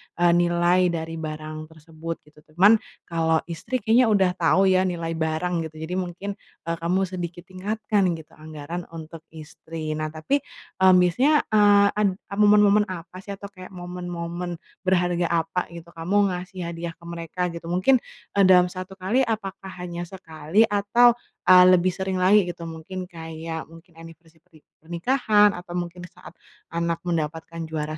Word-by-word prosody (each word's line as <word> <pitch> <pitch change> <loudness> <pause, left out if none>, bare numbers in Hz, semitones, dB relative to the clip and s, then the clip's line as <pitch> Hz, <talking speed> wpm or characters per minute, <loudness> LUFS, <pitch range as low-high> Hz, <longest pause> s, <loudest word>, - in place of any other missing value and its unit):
eee, 175 0 +4
nilai 175 +1 +3
dari 165 -1 -4
barang 155 0 -6
tersebut, 160 +1 -8
gitu. 150 0 -21 0.2
Cuman 205 +5 +6 0.2
kalau 165 -1 0
istri 200 +8 -4
kayaknya 235 +2 +4
udah 195 -4 +3
tau 180 +2 +2
ya 185 0 +3
nilai 170 -2 -3
barang 160 +1 -1
gitu, 155 - -19
jadi 180 +3 -2
mungkin, 185 +3 -4 0.3
eee, 165 0 -2
kamu 180 +3 +1
sedikit 175 -2 -5
tingatkan 200 +1 -1
gitu 160 0 -12
anggaran 155 +3 -7
untuk 160 0 -8 0.2
istri. 155 0 -7
Nah, 155 - -1
tapi 160 - -1 0.4
eee, 190 0 +6
biasanya, 250 - +4
eee, 205 -1 +6
ad 210 -1 +2 0.3
momen-momen 210 0 +5
apa 180 0 -8
sih 200 +1 -7
atau 200 0 -10
kayak 185 -1 -11
momen-momen 175 -1 -5 0.3
berharga 175 -2 +2
apa 170 +2 -1
gitu 170 0 -10
kamu 195 +5 +1
ngasih 180 -1 -6
hadiah 170 0 -5
ke 170 +1 -19
mereka 170 +1 -6
gitu? 170 0 -8
Mungkin, 185 +10 +3 0.4
eee, 195 - +6
dalam 180 -1 +6
1 185 +1 -7
kali 215 +8 +1
apakah 195 -3 -4
hanya 175 0 -5
sekali 165 +1 -1
atau, 235 +4 +4 0.3
eee, 180 0 +9
lebih 180 +1 +3
sering 190 0 -3
lagi 195 +1 +5
gitu, 170 -1 -6
mungkin 180 +3 -7
kayak 160 -1 -6
mungkin 165 +1 -17
anniversary 165 0 -14
perni 155 -2 -21 0.2
pernikahan 205 - +2
atau 175 0 -9
mungkin 175 0 -5
saat 175 - -15 0.3
anak 170 0 -2
mendapatkan 165 -1 -3
juara 155 -1 -4
175 Hz, 155 wpm, -24 LUFS, 165-190 Hz, 0.4 s, eee